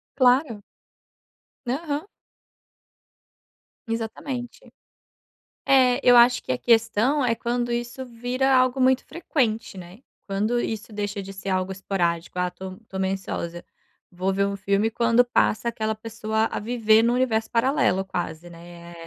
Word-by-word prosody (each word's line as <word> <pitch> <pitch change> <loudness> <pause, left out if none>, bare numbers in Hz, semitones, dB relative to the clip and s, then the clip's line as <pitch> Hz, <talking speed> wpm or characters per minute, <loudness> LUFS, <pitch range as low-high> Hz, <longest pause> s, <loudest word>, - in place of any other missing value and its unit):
Claro. 250 -4 +3 1.0
Aham. 295 +4 -2 1.8
Exatamente. 245 - -5 1.0
É 260 -1 +4
eu 245 -1 +6
acho 240 +1 +6
que - - -9
a 125 - -1
questão 230 +4 +2
é 230 -2 +2
quando 240 +1 -2
isso 240 +2 -3
vira 245 +3 -1
algo 255 +1 +3
muito 260 0 +3
frequente, 230 - -2
né? 185 +7 -11 0.2
Quando 210 +5 0
isso 220 -1 -4
deixa 205 -1 -3
de 195 +1 -9
ser 195 0 -6
algo 185 0 -1
esporádico: 180 -3 -2
"Ah, 180 0 0
tô 185 0 -9
tô 190 - -6
meio 190 0 0
ansiosa, 175 -3 -5 0.5
vou 185 +2 -2
ver 200 +1 +1
um 200 0 -3
filme". 200 +3 0
Quando 235 +1 +3
passa 235 -1 +1
aquela 220 -1 -2
pessoa 220 0 -2
a - - -3
viver 220 0 +3
num 235 +1 +2
universo 225 -3 0
paralelo 230 -6 +2
quase, 175 -2 -5
né, 170 0 -12
225 Hz, 140 wpm, -24 LUFS, 195-245 Hz, 1.8 s, eu